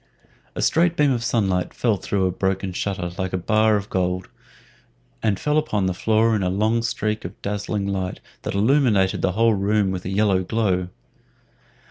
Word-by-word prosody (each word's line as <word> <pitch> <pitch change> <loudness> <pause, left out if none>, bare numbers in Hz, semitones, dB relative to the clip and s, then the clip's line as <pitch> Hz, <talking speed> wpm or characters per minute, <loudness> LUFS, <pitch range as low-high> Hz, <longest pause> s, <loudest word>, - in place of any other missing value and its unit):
A - - -2
straight 170 +1 +2
beam 145 -2 +4
of 120 -3 -1
sunlight 95 -7 0
fell 115 -4 +1
through 95 0 -1
a 90 - +1
broken 95 0 -2
shutter 90 -2 -3
like 95 0 -2
a - - +1
bar 110 +4 +2
of 100 -1 -2
gold, 90 0 -1 0.9
and 100 -3 0
fell 150 +1 +2
upon 105 -10 -1
the 95 - 0
floor 110 +4 +2
in 105 - 0
a 90 - 0
long 110 +5 +1
streak 110 -2 -2
of - - -8
dazzling 100 0 -2
light 95 -2 -3 0.2
that - - -4
illuminated 110 -4 +2
the 90 - +1
whole 115 +2 +3
room 100 0 +1
with 90 -1 -4
a - - -4
yellow 95 -1 +2
glow. 95 -3 0
100 Hz, 180 wpm, -22 LUFS, 95-110 Hz, 0.9 s, beam